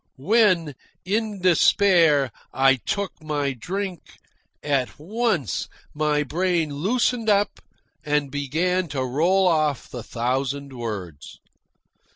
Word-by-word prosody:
When, 180 - +2 0.3
in 210 0 -2
despair, 170 - +4 0.2
I 135 0 +4
took 200 - -4
my 145 -3 -2
drink, 185 - -4 0.6
at 140 -4 -1
once 180 - -1 0.2
my 150 -1 +1
brain 165 0 0
loosened 225 - 0
up 205 0 +2 0.4
and 150 -2 0
began 170 +6 0
to 135 -3 -2
roll 175 +9 +2
off 155 -5 +1
the 120 - -6
thousand 135 +4 -2
words. 100 - -7
155 Hz, 105 wpm, -23 LUFS, 135-185 Hz, 0.6 s, despair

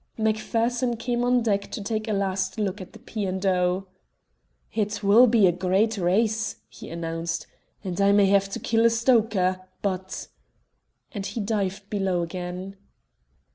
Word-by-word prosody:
Macpherson 230 +3 0
came 240 +1 -1
on 245 -1 +3
deck 200 -3 0
to - - -5
take 215 +1 -3
a - - -1
last 190 -1 -1
look 205 -1 -2
at 185 - -10
the - - -11
P. 215 -2 -5
and 190 +1 -3
O. 180 0 +1 0.9
"It 210 -1 -2
will 220 +5 +7
be 225 -3 +5
a 180 - +5
gr 180 +2 -5
reat 215 +4 +3
race," 215 +4 +1
he - - -11
announced, 165 0 -3 0.4
"and 185 -1 -3
I 200 0 +5
may 200 0 +5
have 195 0 +3
to - - -5
kill 225 0 +1
a - - +5
stoker. 220 -6 +2 0.2
But 190 -1 -3 0.4
" - - -39
Then 205 - -4
he 200 - -4
dived 200 -2 -2
below 190 -4 0
again. 180 +3 -6
200 Hz, 170 wpm, -25 LUFS, 185-220 Hz, 0.9 s, will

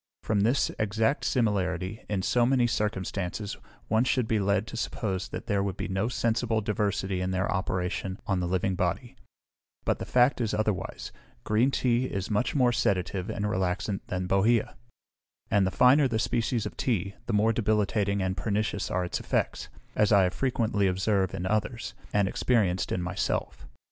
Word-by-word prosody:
From 105 -2 +1
this 120 +6 +2
exact 110 +6 +1
similarity 100 -4 0
in 100 -3 -1
so 120 +4 +2
many 125 0 +3
circumstances, 100 -2 -2 0.3
one 110 +2 +3
should 125 -2 +1
be 110 -1 +1
led 100 +1 +1
to 115 - -8
suppose 100 -4 -3
that - - -6
there 100 -4 +1
would 100 -1 -2
be - - -3
no 95 +3 -1
sensible 115 -1 0
diversity 100 -3 -1
in 90 - -1
their 95 +1 0
operation 95 0 -2
on 95 -4 0
the 90 - -1
living 95 +2 0
body; 90 +7 -2 0.7
but - - +1
the - - -4
fact 125 +1 +3
is 110 -2 0
otherwise: 105 -3 -2 0.3
green 110 +5 +2
tea 125 -2 +1
is 100 -4 -3
much 105 +8 0
more 125 -3 +4
sedative 95 -4 0
and 105 - -2
relaxant 95 0 -1
than 90 0 -2
bohea; 105 +4 +2 0.8
and 100 -2 +4
the - - +1
finer 130 +7 +5
the 115 -3 -1
species 115 0 0
of - - -5
tea, 100 -6 -1
the 120 - -1
more 110 +2 +3
debilitating 105 -2 +1
and 95 0 -1
pernicious 105 0 -1
are 90 0 0
its 85 - -3
effects, - - -2 0.3
as 105 0 +3
I 100 -2 +6
have 90 0 +1
frequently 110 -6 +1
observed 95 0 +1
in 90 - -3
others, 110 +4 -1 0.2
and 100 -2 +2
experienced 100 -4 +1
in 90 - -1
myself. 90 +2 -2
105 Hz, 175 wpm, -28 LUFS, 95-115 Hz, 0.8 s, I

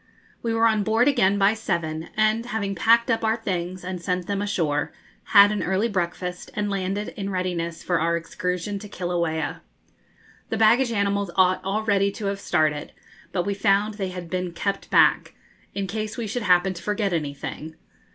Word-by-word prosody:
We 230 - -1
were 225 0 +2
on 220 -2 +3
board 220 +5 +2
again 200 -8 +3
by 200 +1 +4
seven, 170 -7 -3
and, 215 +2 +2
having 215 -4 -2
packed 230 +6 +4
up 225 - 0
our 220 0 +2
things 185 -4 -3
and 180 -1 -5
sent 180 +1 -2
them 200 +1 -2
ashore, 160 -8 -1 0.3
had 205 0 +7
an 210 - -1
early 190 +5 +1
breakfast, 180 -2 -3
and 205 -1 -1
landed, 195 +1 -2
in 200 -1 -5
readiness 175 -3 -3
for 180 -2 +1
our 170 +1 +1
excursion 180 +4 -3
to 210 - -10
Kilauea. 170 -4 -2 0.9
The 225 - -1
baggage 235 +3 +4
animals 200 -2 0
ought 185 -1 +3
already 200 0 +1
to 215 - -6
have 200 0 -2
started, 155 -5 0 0.4
but 175 - -1
we 200 - 0
found 200 +2 +2
they 195 -3 -3
had 180 -1 -7
been 180 0 -3
kept 200 +3 -3
back, - - +3 0.4
in 200 - -1
case 215 +3 -4
we 235 - -3
should 225 +4 -3
happen 185 -2 +3
to 175 - -9
forget 205 +1 -1
anything. 150 0 -4
195 Hz, 180 wpm, -24 LUFS, 175-210 Hz, 0.9 s, had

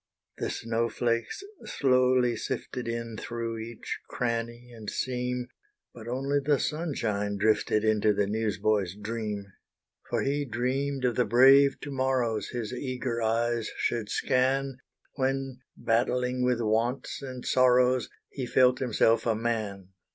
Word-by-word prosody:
The - - -1
snow 115 0 -1
flakes 115 - -1 0.2
slowly 125 -2 +2
sifted 120 +2 -4
In 115 -1 -4
through 115 -1 -4
each 115 +1 -6
cranny 120 0 -3
and 110 -2 -7
seam, 125 -1 -2 0.5
But 115 -1 -11
only 135 +4 0
the 145 0 +3
sunshine 115 -11 -2
drifted 105 +1 +2
Into 110 -1 +3
the 100 0 +1
news 110 +1 -1
boy's 100 -4 +1
dream. 105 -1 -4 0.6
For - - 0
he 145 +1 0
dreamed 130 +2 -1
of 120 -2 0
the 125 - +3
brave 135 +5 +6
to 145 - -6
morrows, 130 -5 0
His 120 -2 -4
eager 125 -2 -3
eyes 115 0 0
should 115 -3 -1
scan, 130 +1 +1 0.4
When 135 -1 -1 0.2
battling 125 +2 +1
with 125 -1 +1
wants 115 +6 -1
and 130 -2 -7
sorrows, 125 -1 +4 0.2
He 130 -3 -4
felt 125 0 +4
himself 115 -2 +2
a 115 - +2
Man. 105 -4 -3
120 Hz, 135 wpm, -28 LUFS, 110-130 Hz, 0.6 s, brave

